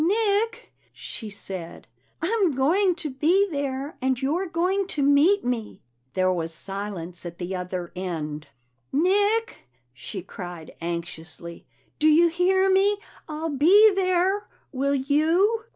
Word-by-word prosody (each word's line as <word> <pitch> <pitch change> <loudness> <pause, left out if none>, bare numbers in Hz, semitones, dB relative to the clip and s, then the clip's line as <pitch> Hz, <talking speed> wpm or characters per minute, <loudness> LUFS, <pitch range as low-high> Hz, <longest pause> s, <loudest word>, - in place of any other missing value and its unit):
"Nick," 440 +5 0 0.2
she 220 - -7
said, 190 -4 -7 0.4
"I'm 385 -3 +2
going 350 +8 +3
to 310 -4 -5
be 340 +10 +3
there, 280 0 -3
and 260 -1 +1
you're 315 +8 -1
going 365 +4 0
to 295 -6 -1
meet 295 +8 +4
me." 240 -3 -3 0.3
There 185 0 +2
was 165 -2 -3
silence 195 -3 -2
at 170 -1 -7
the 180 +1 -4
other 180 -1 -4
end. 160 -4 -4 0.4
"Nick!" 405 - +1 0.3
she 180 - -7
cried 175 -4 -8
anxiously. 170 0 -6 0.3
"Do 310 - +4
you 330 +3 +6
hear 375 +3 +2
me? 390 +2 +3 0.3
I'll 310 +1 -3
be 385 +10 +6
there. 380 +1 +1 0.2
Will 280 0 0
you?" 325 - +2
290 Hz, 130 wpm, -25 LUFS, -, 0.4 s, you